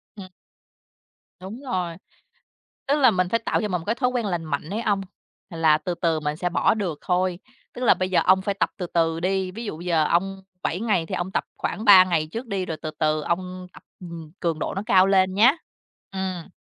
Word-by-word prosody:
Ừm. 195 -3 -9 1.1
Đúng 205 +8 -8
rồi. 180 -10 -3 0.9
Tức 285 - +3
là 255 -4 +6
mình 185 -1 0
phải 230 - +1
tạo - - +1
cho 210 - -1
mình - - -7
một - - -13
cái 225 +3 0
thói 250 -1 +1
quen 245 -3 -2
lành 175 -4 -2
mạnh 150 +2 -3
ấy 215 +4 -2
ông, 200 -3 0 0.5
là 160 -3 +3
từ 180 +2 -4
từ 165 -2 0
mình 150 0 -2
sẽ 180 +2 -2
bỏ 175 - +2
được 185 -9 -3
thôi. 180 0 0 0.3
Tức 250 - -6
là - - +6
bây 185 0 -2
giờ 185 - +3
ông 190 +1 +5
phải 200 +1 -1
tập 195 - 0
từ 180 - -3
từ 165 -1 0
đi, 190 +1 -1
ví 230 +4 -7
dụ 160 -5 -5
giờ 165 -3 +1
ông 195 +4 0 0.2
7 180 - -2
ngày 210 -7 +1
thì - - -4
ông 175 +2 -3
tập - - 0
khoảng 220 - -3
3 195 -3 +9
ngày 165 -4 0
trước 235 +2 -5
đi, 195 -3 -2
rồi 160 -3 -4
từ 155 - -4
từ 155 -1 +1
ông 180 +2 -3
tập, - - -15 0.2
ừm, 170 -3 -9
cường 165 -3 -1
độ - - -3
nó 195 - -2
cao 190 -1 +5
lên 190 -1 +3
nhá. 230 +7 +6 0.6
Ừm. 190 -3 -4
185 Hz, 230 wpm, -24 LUFS, 170-200 Hz, 1.1 s, 3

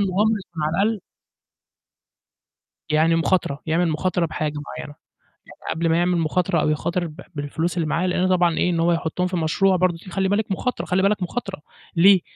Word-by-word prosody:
مغامرة 200 +3 +2
يكون 160 -2 -6
على 150 - +1
الأقل 220 -1 0 1.9
يعني 160 +2 +3
مخاطرة، 165 -4 0
يعمل 165 +2 +2
مخاطرة 175 +2 0
بحاجة 155 -1 -3
معيّنة، 145 - -8 0.5
يعني - - -8
قبل 165 0 0
ما 165 - +3
يعمل 175 0 +2
مخاطرة 165 +2 +1
أو - - +1
يخاطر 170 +4 -1
ب 155 +3 -11
بالفلوس 160 +5 -2
اللي 160 -3 0
معاه، 170 +4 0
لأنه 180 0 +1
طبعًا 175 -3 +3
إيه، 180 - +2
إن 170 - 0
هو 170 +1 +3
يحطّهم 170 +2 -1
في 180 0 -2
مشروع 185 +4 +2
برضه 180 -1 +1
دي 185 - -10
خلّي 190 +1 0
بالِك 205 0 0
مخاطرة 250 +6 -2
خلّي 185 +1 +1
بالك 200 -1 +2
مخاطرة، 195 -2 -4 0.3
ليه؟ 185 +2 +6
175 Hz, 185 wpm, -22 LUFS, 165-185 Hz, 1.9 s, ليه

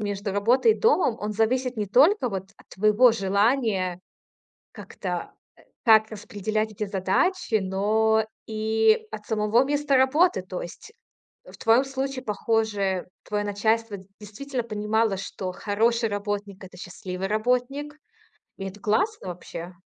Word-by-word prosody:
между 205 -1 -3
работой 240 - +3
и - - -7
домом, 370 - +3
он 210 0 -3
зависит 250 +4 0
не 210 -1 -2
только 275 - +4
вот 195 -2 -5
от - - -21
твоего 215 +5 +4
желания 200 -2 +1 0.7
как-то, - - -6 0.2
э, - - -20 0.2
как 220 -2 +5
распределять 215 0 -3
эти 210 0 -4
задачи, 220 - 0
но 215 +3 +1 0.2
и 220 - +1
от 210 - -8
самого 220 +3 +2
места 290 -1 +1
работы. 265 - +3
То 185 -1 -6
есть 425 - -10 0.5
в - - -14
твоём 230 +4 +3
случае, 270 -1 -4
похоже, 210 -3 -1 0.2
твоё 205 0 -2
начальство 220 +1 0 0.2
действительно 245 +5 -5
понимало, 215 -1 0
что 190 -1 -5
хороший 225 +4 0
работник- 205 -1 -4
это 185 -1 -13
счастливый 180 +1 -6
работник. 250 +7 -1 0.6
И 195 - -6
это 195 +2 -10
классно 290 - 0
вообще. 175 0 -8
215 Hz, 135 wpm, -25 LUFS, 200-250 Hz, 0.7 s, как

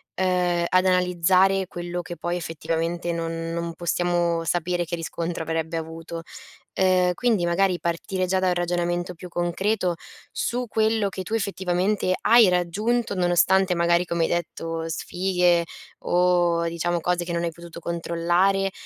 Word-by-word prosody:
ehm, 180 -2 +1
ad 185 0 +3
analizzare 185 +1 +3
quello 175 0 -5
che 175 0 -8
poi 175 0 -2
effettivamente 165 +1 -3
non 165 0 -3
non 170 0 -3
possiamo 175 -1 0
sapere 175 +1 -1
che 170 - -3
riscontro 165 0 -4
avrebbe 160 0 -2
avuto. 165 +1 -6 0.6
Ehm, 185 -1 +3
quindi 225 -6 +1
magari 180 +1 +1
partire 180 +2 -2
già 190 +1 +1
da 185 - +1
un - - +2
ragionamento 175 0 -1
più 180 +2 -10
concreto 175 +2 0 0.4
su 245 +1 -2
quello 220 -1 +1
che 190 - -6
tu 200 - -7
effettivamente 190 -2 0
hai 230 -3 +7
raggiunto, 200 +6 0
nonostante 180 +1 +3
magari 170 0 +3
come 170 -1 -1
hai - - +2
detto 165 -1 -3
sfighe 180 0 +1 0.4
o 175 -1 +2
diciamo 170 +1 -1
cose 180 +1 0
che 175 - -5
non 170 0 -1
hai 170 - -1
potuto 170 0 -11
controllare, 175 +3 +1
175 Hz, 145 wpm, -24 LUFS, 170-185 Hz, 0.6 s, hai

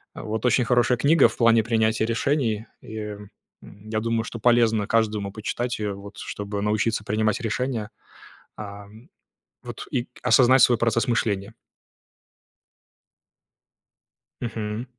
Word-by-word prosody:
Вот. 110 +2 -4
Очень 125 0 +3
хорошая 120 +1 +2
книга 155 +5 +5
в - - -9
плане 115 -1 +4
принятия 110 -1 +1
решений. 115 -2 0
И - - -11 0.7
я 110 +2 -6
думаю, 115 0 -1
что 115 - -7
полезно 115 -3 +3
каждому 105 -3 0
почитать 120 +3 -3
ее, 105 -1 -2
вот 100 +1 -11
чтобы 100 0 -5
научиться 105 +1 0
принимать 110 +2 0
решения, 115 -1 -2 0.7
а, 100 -1 -8 0.8
вот, - - -8
и 120 - -1
осознать 125 +1 +5
свой 120 -1 +5
процесс 115 +2 +1
мышления. 105 -3 -1 2.9
Мгм. 110 0 -4
110 Hz, 115 wpm, -24 LUFS, 105-120 Hz, 2.9 s, книга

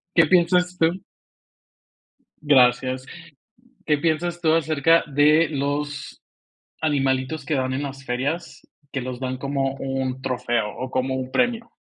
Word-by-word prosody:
qué 165 - +6
piensas 180 +1 +3
tú? 170 +3 +1 1.4
Gracias, 130 -2 +3 0.8
¿qué 150 -2 +2
piensas 170 +3 -1
tú 160 -2 +2
acerca 165 0 +3
de 150 +2 +4
los 145 0 -3 0.6
animalitos 140 -1 0
que 150 +1 -1
dan 130 -1 -1
en 135 +2 -2
las 135 -1 -7
ferias, 135 +7 -3 0.3
que 135 - -2
los 125 0 -5
dan 130 0 -3
como 135 0 -2
un 135 -1 -3
trofeo 120 -4 -1
o 130 - -4
como 130 +1 0
un 130 0 -5
premio? 240 -2 0
140 Hz, 130 wpm, -23 LUFS, 130-160 Hz, 1.4 s, qué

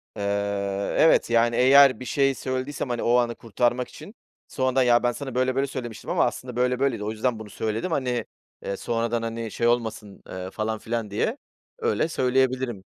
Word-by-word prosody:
Eee, 100 -1 -2
evet, 160 - +5
yani, 115 0 +3
eğer 135 0 +6
bir 125 - -7
şey 135 +2 +1
söylediysem, 130 +1 -3
hani, 120 -1 -2
o 120 - +3
anı 120 -1 +1
kurtarmak 120 +3 -1
için 210 - -12 0.3
sonradan 130 -1 +1
"Ya, 120 -1 +4
ben 120 - +3
sana 135 0 -7
böyle 130 0 +1
böyle 135 +1 +1
söylemiştim 120 -4 -7
ama - - +3
aslında 125 -2 -4
böyle 125 +1 +1
böyleydi. 130 -6 0
O 105 - -2
yüzden 115 +1 -1
bunu 110 -1 -9
söyledim, 110 - -3
hani, 125 -6 -1 0.4
eee, 100 - -3
sonradan, 115 0 -1
hani, 115 -1 -4
şey 115 - 0
olmasın." 110 -4 -2
eee, 95 0 -6
falan 110 +1 -3
filan 115 -1 -3
diye 220 - -1 0.4
öyle 460 - +1
söyleyebilirim. 130 - 0
120 Hz, 180 wpm, -25 LUFS, 110-130 Hz, 0.4 s, eğer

